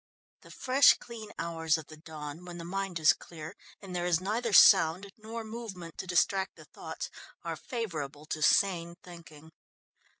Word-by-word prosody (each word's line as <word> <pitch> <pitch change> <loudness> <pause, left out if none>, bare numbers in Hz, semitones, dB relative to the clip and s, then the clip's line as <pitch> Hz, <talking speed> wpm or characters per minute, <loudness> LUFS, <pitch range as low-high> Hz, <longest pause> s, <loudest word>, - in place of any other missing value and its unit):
The - - -16
fresh 265 +1 +5
clean 220 -3 -10
hours 165 -1 0
of 160 - -8
the 155 - -12
dawn, 155 0 -9
when 175 -1 -8
the 170 - -7
mind 190 -1 -3
is 155 -2 +6
clear, 160 +2 -10 0.3
and 185 -2 -7
there 175 0 -1
is 170 -2 +3
neither 220 +5 -2
sound 185 +1 +6
nor 225 +1 -7
movement 215 -7 -8
to 190 - -5
distract 190 +2 +1
the - - -14
thoughts, - - -7 0.3
are - - -3
favourable 155 - -5
to 155 0 -4
sane 170 0 +3
thinking. 160 -3 -13
175 Hz, 165 wpm, -30 LUFS, 160-205 Hz, 0.3 s, is